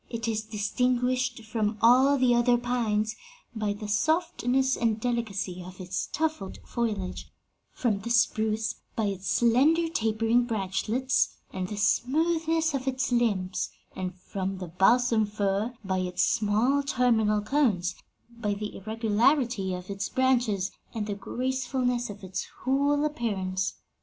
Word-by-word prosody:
'It 230 -1 -4
is 220 -1 0
distinguished 245 +3 0
from 220 -1 -1
all 260 +4 +5
the 255 -2 +4
other 240 0 +4
pines 225 -3 0 0.4
by 215 -2 -1
the 205 +1 -5
softness 265 - +1
and 225 -2 0
delicacy 210 -6 -2
of 185 +1 -11
its 185 0 -3
tufted 315 -12 -2
foliage, 215 -6 -3 0.4
from 220 -5 0
the 235 - -6
spruce 220 -1 +1 0.2
by 220 - 0
its 195 -1 -3
slender, 280 +8 +4
tapering 225 -4 +1
branchlets 225 +4 0 0.2
and 185 -1 -3
the 210 - -6
smoothness 320 +8 +1
of 270 -1 -3
its 260 -1 -1
limbs, 205 -6 0 0.3
and 185 -1 -4
from 190 +1 -4
the 180 -2 -6
balsam 225 +6 +3
fir 205 +1 -1
by 190 -1 0
its 180 -1 0
small 225 +7 +2
terminal 235 -6 +2
cones, 210 -7 +1 0.3
by 230 -3 -3
the 210 +1 -5
irregularity 225 +1 +1
of 180 +2 -7
its 195 0 -3
branches 240 -7 +1 0.2
and 215 -2 -2
the 205 - -3
gracefulness 250 +2 -1
of 205 -1 -9
its 185 0 -4 0.2
whole 285 +3 +2
appearance.' 190 -9 -2
225 Hz, 135 wpm, -27 LUFS, 205-250 Hz, 0.4 s, all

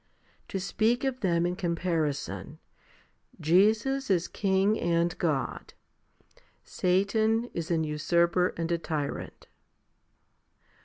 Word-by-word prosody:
To 195 - -3
speak 220 +6 0
of 265 -2 -1
them 170 -4 +1
in 175 0 -1
comparison, 170 -5 -2 0.8
Jesus 215 - +2
is 180 -3 +2
King 195 +1 +1
and 170 0 +1
God 150 -6 -2 0.5
\ - - -32
Satan 220 +5 +1
is 170 -1 -4
an 165 -2 +1
usurper 170 +4 +2
and 165 0 -2
a 170 - +1
tyrant. 150 -4 -4
180 Hz, 105 wpm, -28 LUFS, 170-210 Hz, 0.8 s, Jesus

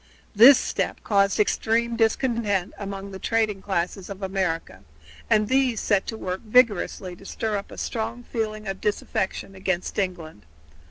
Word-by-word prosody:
This 245 +6 +9
step - - -2
caused 200 -2 +2
extreme 230 +2 +1
discontent 225 -4 0
among 200 -1 -6
the 190 - -8
trading 215 -3 0
classes 190 0 -2
of 200 0 -7
America, 180 - -2 0.5
and 210 0 +3
these 260 -2 +2
set 200 -2 +1
to 225 - -4
work 185 -2 -4
vigorously 210 -5 +2
to 195 - -16
stir 215 +2 -3
up 200 - -4
a - - -11
strong 230 +1 -3
feeling 215 -3 -4
of 195 -1 -4
disaffection 195 -1 -2
against 185 0 -2
England. 165 - -4
205 Hz, 150 wpm, -24 LUFS, 190-225 Hz, 0.5 s, This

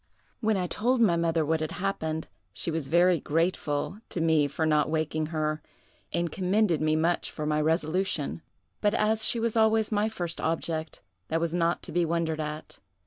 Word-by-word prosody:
"When 220 -2 +1
I 180 - 0
told 240 +8 0
my 205 -7 +4
mother 165 -1 +1
what 160 +2 +1
had 155 -1 -3
happened, 160 -5 -2 0.2
she 170 - -1
was 160 -3 -2
very 175 +2 +4
grateful 165 +3 -1
to - - -3
me 160 -3 +3
for 160 +3 -2
not 150 -1 +2
waking 155 0 -1
her, 155 -1 -2 0.5
and 170 -1 -1
commended 185 -2 +1
me 155 0 +2
much 165 +2 +1
for 155 - -5
my 150 0 +1
resolution; 160 0 0 0.4
but 210 +1 +2
as 220 +1 +2
she 235 - +1
was 230 0 0
always 220 -1 +3
my 210 +1 +1
first 175 -6 -4
object, 160 -3 -2 0.2
that 165 - 0
was 170 0 -1
not 170 0 +1
to - - -7
be 175 +2 +2
wondered 165 -1 -1
at. 150 0 -6
165 Hz, 185 wpm, -28 LUFS, 155-190 Hz, 0.5 s, my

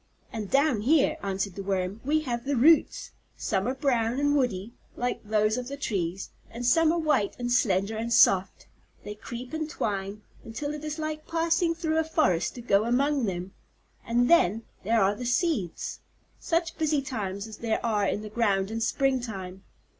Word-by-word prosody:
"And 215 -3 -4
down 275 -6 +2
here," 280 +5 +3
answered 195 0 -2
the 195 - -6
Worm, 195 +1 -2
"we 305 +4 +1
have 240 -5 -3
the 280 +2 -1
roots. 305 +7 +3 0.3
Some 195 0 -1
are 255 - -1
brown 245 -3 0
and 290 0 +2
woody, 235 -5 -1 0.2
like 245 0 -2
those 215 +1 +1
of 250 -1 -4
the 280 +1 -6
trees, 190 -7 -3 0.2
and 240 +2 -6
some 320 +6 +4
are 340 - 0
white 305 -11 +1
and 245 0 -3
slender 200 -2 +1
and 230 +1 -3
soft. 195 -5 +4 0.4
They 205 - -6
creep 240 +5 -8
and 315 -1 -3
twine, 200 -4 -3 0.2
until 290 +6 -5
it 300 0 -7
is 305 0 -4
like 310 -1 -4
passing 330 +1 +1
through 320 -1 0
a - - +2
forest 305 - +1
to 245 - -7
go 205 -2 +3
among 270 +2 +1
them. 185 -1 -4 0.5
And 240 +1 +1
then, 225 - +4 0.2
there 220 +1 +3
are 195 +1 +3
the 245 - -7
seeds. 245 - -1 0.4
Such 335 -1 -1
busy 305 -3 +1
times 200 -7 -4
as 220 -1 -9
there 230 0 -2
are 210 -3 +1
in 210 - -2
the 215 - -7
ground 205 -3 +1
in 225 0 -3
spring 265 +3 +1
time! 190 -5 -7
235 Hz, 185 wpm, -27 LUFS, 205-290 Hz, 0.5 s, some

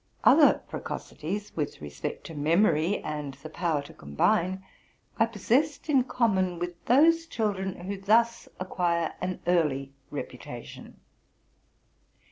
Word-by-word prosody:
Other - - +6
precocities, 200 +7 -5
with 150 -3 -3
respect 75 -1 -6
to - - -8
memory 165 +3 +2
and 150 -3 -4
the 155 +3 -11
power 160 -4 -1
to - - -12
combine, 185 - 0 0.6
I 225 - +5
possessed 260 - 0
in 265 -4 +4
common 190 -9 +1
with 175 0 -5
those 330 +6 +5
children 200 - -2
who 195 +2 -5
thus 230 +3 +2
acquire 175 -3 0
an 185 0 -3
early 145 -6 +1 0.2
reputation. - - -8
185 Hz, 115 wpm, -28 LUFS, 155-220 Hz, 0.6 s, Other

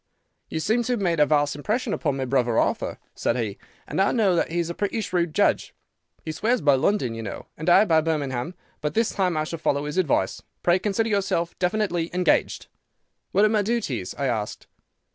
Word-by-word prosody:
"'You 160 - -3
seem 220 +9 +1
to 250 - 0
have 240 - -1
made 175 -5 0
a 150 - +5
vast 145 -2 +2
impression 215 - -1
upon 145 -4 -1
my 135 - -2
brother 125 -3 +1
Arthur,' - - 0 0.2
said 115 - -1
he; 110 -4 -3 0.3
'and - - 0
I 195 - +3
know 205 -7 +3
that 170 - +1
he 170 - -3
is 170 -1 0
a 170 - -4
pretty 205 +4 -2
shrewd 175 -6 -1
judge. - - +1 0.5
He 160 - -2
swears 225 +10 +1
by 145 -5 +4
London, 135 - +1
you 115 - -5
know; 105 -3 -6
and 160 +3 -2
I 190 +4 +7
by 160 -5 +4
Birmingham; 150 -1 -2 0.3
but 150 0 -2
this 225 0 +2
time 180 -4 0
I 155 - +1
shall 165 +1 -5
follow 145 -1 0
his 150 +5 -2
advice. 135 - +1 0.2
Pray 175 +1 +4
consider 215 +3 0
yourself 190 -5 0
definitely 180 -3 0
engaged.' 180 -2 +1 0.7
"'What 200 +3 +4
are - - +4
my 215 -1 +2
duties?' 200 - -2
I 140 - -1
asked. 110 -5 -2
170 Hz, 210 wpm, -24 LUFS, 145-200 Hz, 0.7 s, I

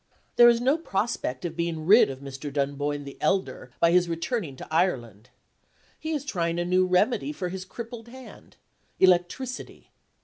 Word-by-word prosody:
There 240 0 +8
is 235 -1 +3
no 270 +6 +2
prospect 195 - -2
of 165 -1 -4
being 165 -2 -3
rid 210 - +6
of 135 0 -7
Mr. 140 +1 -7
Dunboyne 145 +1 -2
the 140 -1 -10
elder 190 0 -1
by 170 - +4
his 175 0 +3
returning 170 - -3
to - - -10
Ireland. 120 - -1 0.7
He 315 - -5
is 295 -3 -2
trying 170 -9 -1
a 175 - -1
new 185 +1 +2
remedy 210 +10 +1
for 190 -12 -4
his 190 +1 -6
crippled 230 +3 -8
hand 260 +1 -13 0.4
electricity. 185 +8 0
180 Hz, 165 wpm, -26 LUFS, 145-235 Hz, 0.7 s, There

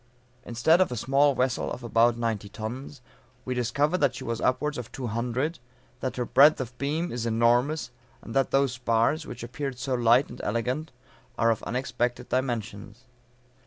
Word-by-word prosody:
Instead 160 +9 +3
of 185 - +2
a - - -2
small 135 +4 +3
vessel 125 -1 0
of 125 - -6
about 120 0 +3
ninety 110 -3 -2
tons, 120 +6 -7 0.4
we 130 - -2
discover 140 +8 0
that 140 -6 +2
she - - -7
is 115 0 -3
upwards 150 +2 0
of 120 - -8
two 130 - -6
hundred; 125 +8 -2 0.4
that 130 -1 -3
her 125 - -2
breadth 145 +6 +6
of 125 -1 -5
beam 155 +5 -1
is 120 -1 -3
enormous; 120 +7 +2 0.3
and 115 - -8
that 135 -1 +2
those 135 -1 +2
spars 120 +5 +1
which - - -8
appeared 135 +2 -5
so 130 +1 -3
light 120 +2 +4
and 120 - -9
elegant, 125 +8 -2 0.5
are 115 0 +3
of 110 -1 -2
unexpected 125 -1 -2
dimensions. 115 -3 -3
125 Hz, 170 wpm, -27 LUFS, 115-135 Hz, 0.5 s, breadth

